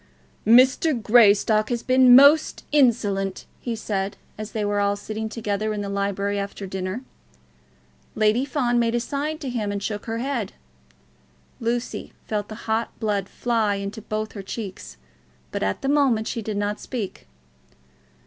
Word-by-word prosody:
"Mr. 255 Hz, +4 st, +5 dB
Greystock 215 Hz, -1 st, +4 dB
has 240 Hz, -2 st, -2 dB
been 255 Hz, -1 st, +6 dB
most 285 Hz, +4 st, +6 dB
insolent," 205 Hz, -9 st, +2 dB
he 235 Hz, -2 st, -3 dB
said 200 Hz, -3 st, -3 dB, 0.2 s
as 215 Hz, 0 st, -7 dB
they 215 Hz, -2 st, -2 dB
were 205 Hz, 0 st, 0 dB
all 200 Hz, 0 st, +2 dB
sitting 220 Hz, +2 st, -5 dB
together 215 Hz, -1 st, -2 dB
in 210 Hz, -, -3 dB
the 200 Hz, -, -4 dB
library 200 Hz, 0 st, -1 dB
after 200 Hz, 0 st, -5 dB
dinner. 190 Hz, +5 st, -4 dB, 1.1 s
Lady 215 Hz, +3 st, +3 dB
Fawn 255 Hz, -4 st, 0 dB
made 235 Hz, 0 st, +1 dB
a -, -, +2 dB
sign 290 Hz, +5 st, -3 dB
to 290 Hz, -, -7 dB
him 225 Hz, -5 st, -2 dB
and 200 Hz, -1 st, -4 dB
shook 210 Hz, +1 st, -4 dB
her 225 Hz, 0 st, -2 dB
head. 240 Hz, -5 st, -3 dB, 1.1 s
Lucy 235 Hz, +1 st, -3 dB
felt 210 Hz, -2 st, -2 dB
the 215 Hz, +1 st, -10 dB
hot 225 Hz, +1 st, -2 dB
blood 205 Hz, -3 st, -1 dB
fly 225 Hz, -4 st, 0 dB
into 200 Hz, +3 st, -5 dB
both 215 Hz, +1 st, -4 dB
her 200 Hz, -, -7 dB
cheeks, 190 Hz, -, -7 dB, 0.5 s
but -, -, -3 dB
at 95 Hz, 0 st, -1 dB
the -, -, -1 dB
moment 270 Hz, -6 st, +2 dB
she 235 Hz, -, -3 dB
did 215 Hz, -1 st, -4 dB
not 205 Hz, +1 st, -1 dB
speak. 205 Hz, -, -6 dB
215 Hz, 160 wpm, -24 LUFS, 200-240 Hz, 1.1 s, been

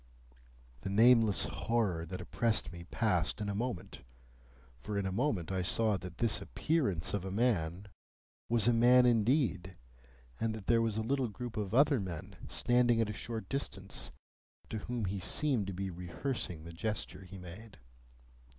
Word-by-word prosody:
The 95 Hz, -, -4 dB
nameless 115 Hz, 0 st, +5 dB
horror 100 Hz, -8 st, -1 dB
that 90 Hz, +2 st, -5 dB
oppressed 115 Hz, -6 st, 0 dB
me 85 Hz, 0 st, -9 dB
passed 95 Hz, -3 st, 0 dB
in 105 Hz, -1 st, -2 dB
a -, -, -1 dB
moment, 115 Hz, -4 st, -4 dB, 0.8 s
for 100 Hz, -, -4 dB
in 100 Hz, -, -1 dB
a 95 Hz, -, -1 dB
moment 100 Hz, -, 0 dB
I 95 Hz, -1 st, 0 dB
saw 110 Hz, +4 st, +2 dB
that 90 Hz, -3 st, -7 dB
this 115 Hz, 0 st, +2 dB
appearance 130 Hz, -, 0 dB
of 100 Hz, -3 st, -1 dB
a 95 Hz, -, -4 dB
man 100 Hz, -4 st, 0 dB, 0.6 s
was 115 Hz, -1 st, +3 dB
a 120 Hz, -, +5 dB
man 125 Hz, +2 st, +6 dB
indeed, 110 Hz, -, +2 dB, 0.6 s
and 110 Hz, -1 st, 0 dB
that 105 Hz, -3 st, -8 dB
there 115 Hz, +2 st, +4 dB
was 110 Hz, -2 st, 0 dB
a 110 Hz, -, 0 dB
little 130 Hz, +2 st, 0 dB
group 120 Hz, +2 st, -6 dB
of 105 Hz, 0 st, -2 dB
other 140 Hz, -1 st, +5 dB
men, 90 Hz, -5 st, -6 dB
standing 120 Hz, -1 st, +3 dB
at 110 Hz, -2 st, +1 dB
a -, -, -5 dB
short 110 Hz, +2 st, -5 dB
distance, 100 Hz, -8 st, -4 dB, 0.6 s
to 110 Hz, -, -2 dB
whom 120 Hz, 0 st, -3 dB
he 95 Hz, +1 st, -2 dB
seemed 125 Hz, 0 st, +1 dB
to 100 Hz, -, -3 dB
be 95 Hz, +1 st, -3 dB
rehearsing 90 Hz, -, -4 dB
the 85 Hz, +1 st, -9 dB
gesture 105 Hz, +3 st, -3 dB
he 95 Hz, +1 st, -10 dB
made. 95 Hz, +4 st, -10 dB
105 Hz, 170 wpm, -33 LUFS, 95-120 Hz, 0.8 s, man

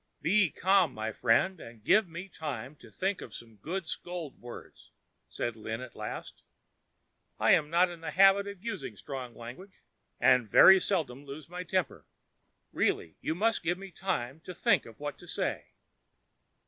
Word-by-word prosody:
"Be 190 Hz, +3 st, +3 dB
calm, 190 Hz, +3 st, +3 dB
my 110 Hz, +1 st, -3 dB
friend, 125 Hz, -, +2 dB
and 115 Hz, -5 st, -12 dB
give 210 Hz, -, +4 dB
me 170 Hz, +3 st, -7 dB
time 150 Hz, -5 st, -6 dB
to -, -, -15 dB
think 195 Hz, +1 st, -2 dB
of 115 Hz, -, -9 dB
some 115 Hz, -2 st, -11 dB
good 170 Hz, -, -4 dB
scold 170 Hz, -2 st, -6 dB
words," 120 Hz, 0 st, -11 dB, 0.4 s
said 120 Hz, -1 st, -3 dB
Lin 110 Hz, 0 st, -5 dB
at 125 Hz, -1 st, -9 dB
last. 105 Hz, 0 st, -7 dB, 1.0 s
"I -, -, +4 dB
am 150 Hz, -, +4 dB
not 175 Hz, +3 st, +4 dB
in 170 Hz, -1 st, -10 dB
the 165 Hz, -, -4 dB
habit 195 Hz, +1 st, +5 dB
of 200 Hz, -2 st, -8 dB
using 145 Hz, -, -5 dB
strong 130 Hz, -3 st, -7 dB
language, 130 Hz, +12 st, -11 dB, 0.4 s
and 125 Hz, -4 st, +4 dB
very 190 Hz, -, +9 dB
seldom 150 Hz, -10 st, -1 dB
lose 145 Hz, +2 st, -9 dB
my 180 Hz, +1 st, -5 dB
temper. 185 Hz, 0 st, -2 dB, 0.6 s
Really 80 Hz, -, 0 dB
you 160 Hz, -, -1 dB
must 225 Hz, +5 st, +1 dB
give 175 Hz, +1 st, 0 dB
me 195 Hz, 0 st, -10 dB
time 160 Hz, -8 st, -3 dB
to 180 Hz, +2 st, -9 dB
think -, -, +2 dB
of 115 Hz, -, -14 dB
what 145 Hz, 0 st, -5 dB
to -, -, -13 dB
say." -, -, -2 dB
160 Hz, 170 wpm, -30 LUFS, 125-190 Hz, 1.0 s, very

